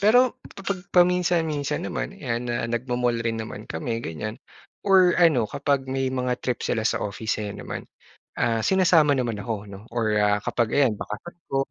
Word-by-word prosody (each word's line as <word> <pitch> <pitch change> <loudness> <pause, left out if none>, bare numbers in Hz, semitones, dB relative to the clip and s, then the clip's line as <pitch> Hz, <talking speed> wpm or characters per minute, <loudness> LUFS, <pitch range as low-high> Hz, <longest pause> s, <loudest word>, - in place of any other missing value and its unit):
pero 245 +5 +5 0.2
kapag 195 -2 -4
paminsan-minsan 175 -5 +2
naman - - -3
'yan 120 +1 -3
na 120 -1 -1
nagmo-mall 120 0 0
rin 115 -1 0
naman 110 - -7
kami 115 +8 -3
ganyan 110 +8 -4 0.5
or 185 -3 +6
ano 155 -10 +5
kapag 140 -1 0
may 135 0 0
mga 125 -1 0
trip 125 -2 -1
sila 115 - 0
sa - - +1
office 105 +2 -2
ayan 105 -1 -4
naman, - - -5 0.6
ah, 115 -1 +2
sinasama 170 -6 +5
naman 120 -4 -1
ako, 105 0 -4
'no, 100 -1 -9
or 110 -3 +1
ah, 105 0 +3
kapag 120 0 0
ayan, 135 -6 +4
bakasyon 105 +14 -7
ko. 135 - -2
125 Hz, 170 wpm, -25 LUFS, 110-165 Hz, 0.6 s, or